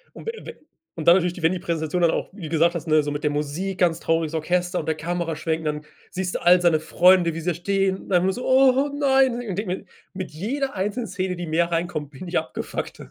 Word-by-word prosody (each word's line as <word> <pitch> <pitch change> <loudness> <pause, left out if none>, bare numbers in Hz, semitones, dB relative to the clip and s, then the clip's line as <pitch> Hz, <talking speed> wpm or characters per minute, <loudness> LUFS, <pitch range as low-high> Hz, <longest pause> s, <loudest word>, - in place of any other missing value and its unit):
Und - - -11
we 455 - -2
we - - -7 0.4
und 160 0 -3
dann 170 - +9
natürlich, 180 -1 -1
wenn 160 - +4
die 185 - -2
Präsentation 170 -1 -2
dann 170 -1 +4
auch, - - -2
wie 200 - -12
du - - -4
gesagt 170 +2 +2
hast, 170 - -5
ne, 155 -1 +4
so 145 - -3
mit 145 +1 -4
der 150 - +2
Musik, 155 +6 -3
ganz 170 -2 +2
trauriges 165 -2 0
Orchester 180 +3 0
und - - -4
der 160 - +1
Kameraschwenk 165 -1 -2
und 160 - -9
dann 150 0 -3 0.3
siehst 185 -1 -2
du - - -2
all 180 +1 +6
seine 170 -3 +3
Freunde, 175 +1 +4
wie 165 - -4
sie 165 - -5
da - - -1
stehen 195 +2 0
und - - -14
dann 180 -2 +4
immer 190 +1 +2
so: 250 +5 -6
„Oh 265 +2 +4
nein“, 270 -3 +3
und 240 - -4
ich 220 -6 -4
denke 205 - -2
mir, 185 +1 -4 0.3
mit 185 -1 -6
jeder 250 - -3
einzelnen 210 +5 -2
Szene, 185 0 -2
die 175 -1 -6
mehr 170 +2 +1
reinkommt, 165 -4 -2
bin 175 +6 -9
ich 170 - +1
abgefuckter. - - -6
175 Hz, 260 wpm, -23 LUFS, 160-190 Hz, 0.4 s, dann